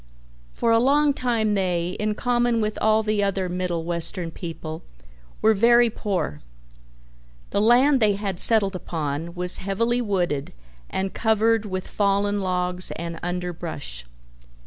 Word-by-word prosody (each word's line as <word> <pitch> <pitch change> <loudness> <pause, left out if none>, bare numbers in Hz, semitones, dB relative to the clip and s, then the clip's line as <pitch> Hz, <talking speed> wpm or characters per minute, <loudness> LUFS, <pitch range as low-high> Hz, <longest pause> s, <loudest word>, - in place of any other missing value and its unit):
For 230 - 0
a 230 - +5
long 285 +4 +3
time 230 -5 0
they, 180 -3 0
in 210 0 -1
common 240 -1 +1
with 215 -1 -1
all 220 0 +3
the 215 -1 0
other 195 -2 0
Middle 175 -2 -2
Western 170 0 -3
people, 165 -2 -7 0.6
were 220 - +5
very 235 +2 +4
poor. 190 - -3 1.1
The 200 - +1
land 255 +5 +5
they 215 -3 +4
had 195 -3 -4
settled 205 -4 +4
upon 160 -1 -4
was 180 0 +3
heavily 230 +5 0
wooded 180 - -1 0.4
and 190 0 -3
covered 220 0 +2
with 185 -1 -4
fallen 205 0 0
logs 180 -1 0
and 170 0 -6
underbrush. 175 - -5
195 Hz, 135 wpm, -23 LUFS, 175-220 Hz, 1.1 s, a